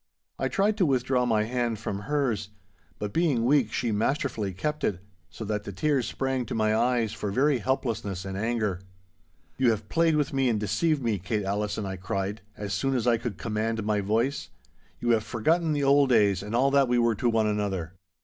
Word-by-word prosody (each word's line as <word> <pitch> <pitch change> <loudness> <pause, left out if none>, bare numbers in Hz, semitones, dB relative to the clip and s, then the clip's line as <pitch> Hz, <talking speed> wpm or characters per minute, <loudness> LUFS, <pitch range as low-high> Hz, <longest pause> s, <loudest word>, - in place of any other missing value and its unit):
I - - +1
tried 205 +2 +1
to 185 - +3
withdraw 125 -2 +1
my 110 -2 +2
hand 120 0 -1
from 100 -1 -4
hers, 120 -4 -1 0.5
but 105 -1 -4
being 145 -9 +2
weak 130 -4 +3
she 120 -3 -1
masterfully 110 -1 -1
kept 150 +11 -3
it, 90 - 0 0.3
so 85 +7 -7
that 105 0 -2
the 100 - -6
tears 140 +4 0
sprang 135 -1 -1
to - - -4
my 110 -1 +2
eyes 115 -1 +1
for 105 -2 -4
very 135 +5 +2
helplessness 110 -7 -2
and 95 0 -5
anger. 105 -3 -1 0.8
'You 130 -2 +4
have 110 -2 -2
played 165 -1 +3
with 145 -2 0
me 135 -2 +2
and 110 -3 +1
deceived 140 - 0
me, 110 -4 0
Kate 105 +3 -2
Allison,' 105 +1 -2
I 95 -1 -4
cried, 95 +3 -3 0.2
as 100 -1 -4
soon 135 +8 0
as 120 -2 0
I 120 -1 +4
could 115 -5 -5
command 110 +2 -2
my 105 -1 +1
voice; 115 +8 0 0.5
'you 120 - +1
have 110 -2 +3
forgotten 160 +10 +1
the 145 -1 0
old 140 0 +4
days 105 -6 +3
and 105 +3 -4
all 135 +3 +3
that 140 -1 +4
we 120 0 +2
were 120 -1 +3
to 120 +3 0
one 110 -1 +2
another. 100 -5 -2
115 Hz, 205 wpm, -27 LUFS, 105-135 Hz, 0.8 s, You